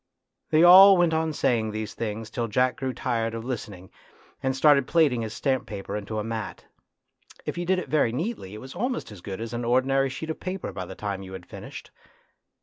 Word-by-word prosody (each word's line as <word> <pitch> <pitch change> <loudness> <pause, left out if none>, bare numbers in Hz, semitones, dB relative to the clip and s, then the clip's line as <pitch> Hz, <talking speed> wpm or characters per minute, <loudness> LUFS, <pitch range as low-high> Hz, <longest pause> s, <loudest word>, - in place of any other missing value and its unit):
" - - -56
They 155 +1 +4
all 190 +2 +10
went 175 -2 +3
on 160 0 0
saying 115 -6 +1
these 110 0 -5
things 110 0 -5
till 115 0 -2
Jack 125 +4 +1
grew 130 -1 -2
tired 115 -2 -2
of 115 0 -6
listening, 100 -7 -6 0.5
and 130 0 0
started 140 -1 +4
plaiting 145 -8 +3
his 110 -1 -5
stamp 135 -2 -1
paper 100 -2 -6
into 105 +1 -4
a 105 - -1
mat. 110 -1 -5 0.8
If - - -3
you 175 0 -4
did 190 0 +3
it 180 - -4
very 140 -4 +2
neatly 130 - -4
it 105 - -9
was 130 0 -10
almost 245 - -3
as 100 -4 -11
good 95 +2 -6
as 115 +1 -5
an 120 0 -3
ordinary 135 +3 +2
sheet 160 +5 -5
of - - -7
paper 185 0 -4
by 95 - -6
the - - -9
time 100 -2 -4
you 95 0 -9
had 95 -2 -8
finished. - - -10
125 Hz, 220 wpm, -26 LUFS, 110-155 Hz, 0.8 s, all